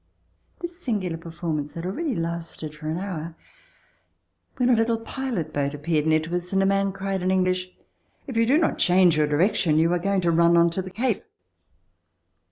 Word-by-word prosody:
This 345 0 -5
singular 200 - -1
per 165 +1 -9
formance 160 -3 -4
had 165 +1 -5
already 260 - -2
lasted 165 -2 -4
for 155 0 -6
an 160 - -2
hour 170 -4 -5 1.2
when 250 - +2
a - - +6
little 225 0 +2
pilot 225 - -4
boat 140 0 -1
appeared 155 +1 0
near 155 0 +4
to 165 +2 -4
us 180 0 -3
and 195 0 +2
a - - +2
man 195 0 +2
cried 195 0 -3
in 185 - 0
English: 185 -1 +1 0.6
"If 260 - -7
you 230 0 +3
do 275 +5 +4
not 325 - +1
change 180 -2 +5
your 150 -1 +2
direction, 155 +1 +2
you 165 +2 +3
are 175 - +1
going 195 +1 0
to 170 -1 +2
run 170 +1 +4
onto 170 +2 +3
the 185 - -7
Cape." 225 +3 -1
180 Hz, 190 wpm, -24 LUFS, 165-195 Hz, 1.2 s, a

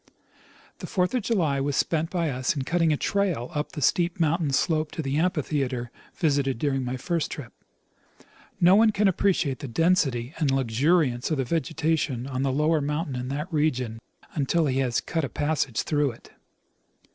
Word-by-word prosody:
The - - -6
fourth 180 -1 0
of 250 - +1
July 170 -11 +1
was 140 0 -1
spent 160 +2 0
by 170 -4 -1
us 130 +2 -1
in 140 - -2
cutting 165 +2 +2
a 150 - +2
trail 180 -11 -1
up 150 -1 -3
the 150 - -3
steep 175 +4 +1
mountain 165 -1 +1
slope 155 +2 +1
to 160 - -4
the 135 +1 -1
amphitheatre 140 -8 -1 0.2
visited 140 -7 +1
during 135 0 0
my 125 +1 -3
first 165 +5 -1
tramp. 130 -6 -8 1.1
No 175 +2 +6
one 220 +2 +6
can 210 0 +2
appreciate 175 -8 +1
the 140 - -6
density 135 -3 +1
and 150 -4 +2
luxuriance 135 +1 +1
of 155 - 0
the 135 - 0
vegetation 160 -4 -1
on 130 -1 -3
the 135 -1 +1
lower 150 +3 +2
mountain 150 0 -2
in 125 0 -4
that 150 +6 -4
region 130 -7 0 0.3
until 155 +3 +1
he 135 -2 0
has 125 -3 +1
cut 165 -2 -2
a 140 - -2
passage 145 -5 -1
through 145 -2 +1
it. 115 - -18
150 Hz, 180 wpm, -26 LUFS, 135-165 Hz, 1.1 s, No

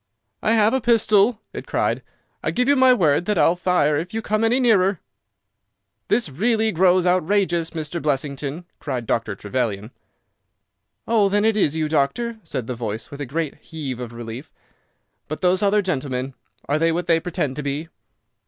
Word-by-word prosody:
"I 220 - +2
have 220 0 +4
a 265 - +1
pistol," 220 -1 +3
it - - -7
cried. - - 0 0.4
"I - - -1
give 250 +1 0
you 285 - +5
my 260 -1 +6
word 175 - +3
that 210 0 0
I'll 170 - +4
fire 175 -5 +2
if 175 +7 -5
you 225 - -2
come 215 +2 0
any 235 +3 +3
nearer." 200 -7 +3 1.1
"This 240 - +1
really 220 - +1
grows 180 0 +3
outrageous, 180 -1 +1
Mr. 160 +1 -5
Blessington," 145 +2 -2
cried 130 -5 -4
Dr. 110 -2 -1
Trevelyan. 105 0 -3 1.2
"Oh, 215 -3 +3
then 205 +2 +2
it 220 -1 +3
is 160 -8 +2
you, 160 -1 0
doctor," 160 +11 0
said 125 - -4
the 125 - -4
voice, 110 -2 -5
with 140 0 -8
a 145 - -4
great 155 +2 -2
heave 145 -7 -6
of 120 -2 -6
relief. 120 +4 -8 0.8
"But 155 - -5
those 185 +1 +3
other 205 0 +3
gentlemen, 135 -6 -2 0.3
are 145 +2 +1
they 165 +1 +3
what 175 +2 -2
they 165 -1 +3
pretend 165 -5 -3
to - - -2
be?" 145 +3 -4
165 Hz, 175 wpm, -22 LUFS, 140-205 Hz, 1.2 s, my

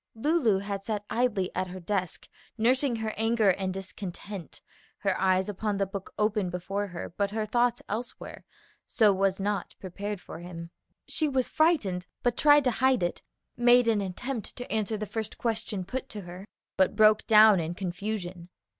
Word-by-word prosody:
Lulu 240 - +2
had 200 0 -4
sat 210 0 -3
idly 225 -6 +1
at 185 0 -1
her 185 +1 -7
desk 185 0 -3 0.3
nursing 255 +3 +2
her 220 -1 -3
anger 225 -2 +3
and 185 +1 -2
discontent, 195 -1 -7 0.4
her 195 -2 0
eyes 190 0 +3
on 210 0 -2
the 195 - +1
book 195 0 -7
open 210 -3 +1
before 195 +3 -3
her, 175 -2 -7
but 200 -1 +1
her 215 +1 -2
thoughts 240 +2 +1
elsewhere, 235 +4 -6 0.4
so 215 -4 +4
was 195 0 +1
not 205 +1 -2
prepared 200 +2 -5
for - - -10
him. 170 -1 -8 0.4
She 310 -2 0
was 260 -2 +1
frightened, 240 - +1 0.2
but 245 -1 +2
tried 290 +1 +6
to 255 - +2
hide 255 -2 +2
it, 175 - -2 0.3
made 240 0 +5
an 220 -3 +3
attempt 215 +5 -5
to 245 - -8
answer 220 0 0
the 215 - -3
first 220 0 -5
question 215 -5 -2
put 260 +6 -5
to 210 - -6
her, 180 +2 -10 0.3
but 190 - +3
broke 215 0 +5
down 215 -3 +7
in 165 +1 -3
confusion. 180 -1 -4
205 Hz, 170 wpm, -28 LUFS, 190-230 Hz, 0.4 s, down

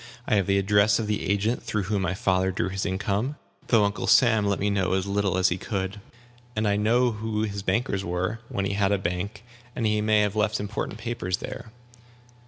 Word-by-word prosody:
I - - +1
have 100 -3 +2
the 100 0 +3
address 100 +1 +4
of 115 - -2
the 105 -5 -2
agent 105 +4 +1
through 110 -3 -2
whom 100 +1 -1
my 90 0 -1
father 95 -3 +1
drew 95 -1 -1
his 95 +1 -2
income, 105 +8 -1 0.3
though 115 -4 +4
Uncle 100 +1 -2
Sam 110 -4 +5
let 100 - +1
me 100 +1 +1
know 95 -2 +1
as 95 0 0
little 100 -2 0
as 95 0 +4
he 90 - -2
could. 95 +1 -3 0.5
And 110 0 0
I 100 - +2
know 120 +4 +3
who 110 0 -2
his 100 -2 -3
bankers 100 -2 0
were 90 +5 -2
(when 95 - -2
he 100 - -1
had 100 0 +1
a 100 - +3
bank), 95 +4 -4 0.3
and 115 - -1
he 105 0 +2
may 105 0 +3
have 105 0 0
left 105 0 +1
important 105 +1 -4
papers 110 -6 -3
there." 120 -3 -8
100 Hz, 215 wpm, -26 LUFS, 95-110 Hz, 0.5 s, Sam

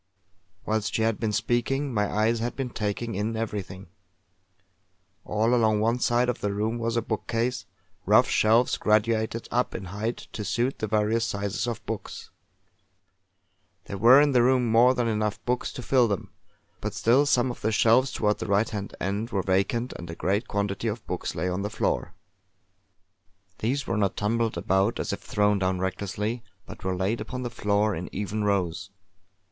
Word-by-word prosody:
Whilst 110 -1 -1
she 110 - +1
had 115 -1 +1
been 110 -2 -1
speaking, 130 +5 0
my 105 -2 0
eyes 110 +2 +1
had 120 +2 -3
been 130 -3 -3
taking 110 +2 -3
in 105 +3 -2
everything. 100 -4 -4 1.4
All 110 +3 +1
along 110 -3 +3
one 115 +3 +1
side 120 +1 +2
of 125 - -2
the 105 - 0
room 110 +3 -1
was 115 0 -1
a 115 - +1
bookcase, 115 +3 -2 0.4
rough - - +6
shelves 115 +3 +3
graduated 110 +1 +1
up 125 +1 0
in - - -5
height 105 +6 -4
to 105 - -4
suit 120 +5 -1
the 110 - -2
various 110 +2 +1
sizes 100 +3 -2
of 120 -2 -4
books. - - -6 1.5
There 100 - -6
were 120 +6 +8
in 145 0 +4
the 125 -2 +4
room 125 0 +3
more 120 +3 +5
than 120 -2 0
enough 105 -2 -1
books 125 0 -1
to 125 - -7
fill 125 -2 +3
them; 100 -3 -3 0.5
but - - -4
still 130 +6 +3
some 125 -3 +2
of - - -10
the 110 - 0
shelves 115 +5 +4
towards 105 -1 0
the - - -4
right 100 +2 +2
hand 105 -2 -5
end 100 +5 -2
were 100 -5 -1
vacant 100 +6 0
and 85 0 -9
a 80 - -6
great 100 +7 -1
quantity 100 +1 -2
of 110 0 -4
books - - -4
lay 85 +4 -1
on 90 +1 -2
the 100 - -2
floor. 110 - -2 1.4
These 135 +6 -1
were - - -1
not 100 -2 0
tumbled 115 +2 0
about 95 +4 +1
as - - -2
if - - -4
thrown 105 -1 +1
down 95 0 0
recklessly, 100 +5 -3 0.2
but - - -11
were 95 -1 -1
laid 100 +5 -1
upon 125 +4 -5
the 120 - -4
floor 105 -1 +1
in 90 +1 -5
even 105 +2 -3
rows. 100 -2 -1
110 Hz, 180 wpm, -26 LUFS, 100-120 Hz, 1.5 s, were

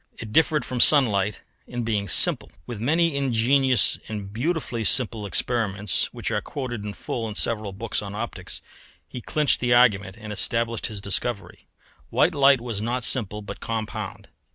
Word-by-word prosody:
It 110 -1 -8
differed 155 0 +3
from 125 - -4
sunlight 105 -8 +4 0.3
in 120 -1 -4
being 105 -3 -1
simple. - - +3
With 115 - -6
many 160 +5 +2
ingenious 130 0 +3
and 105 -3 -6
beautifully 125 -2 -2
simple 115 -3 +1
experiments, 105 0 0
which - - -4
are - - 0
quoted 125 -6 -5
in 105 -1 -5
full 115 +2 -4
in 105 - -7
several 110 -2 -1
books 105 +3 -3
on 100 -1 -7
optics, 105 - -5 0.4
he 125 - -8
clinched 150 +1 +2
the 120 -1 +3
argument 100 -5 +3
and 105 -1 -7
established 115 +2 0
his 105 -3 -7
discovery. 100 -1 -3 0.4
White 175 - +2
light 140 -3 +5
was 115 -4 -4
not 120 +3 -2
simple 105 -4 0
but 100 - -8
compound. 110 -2 -5
115 Hz, 160 wpm, -24 LUFS, 105-125 Hz, 0.4 s, light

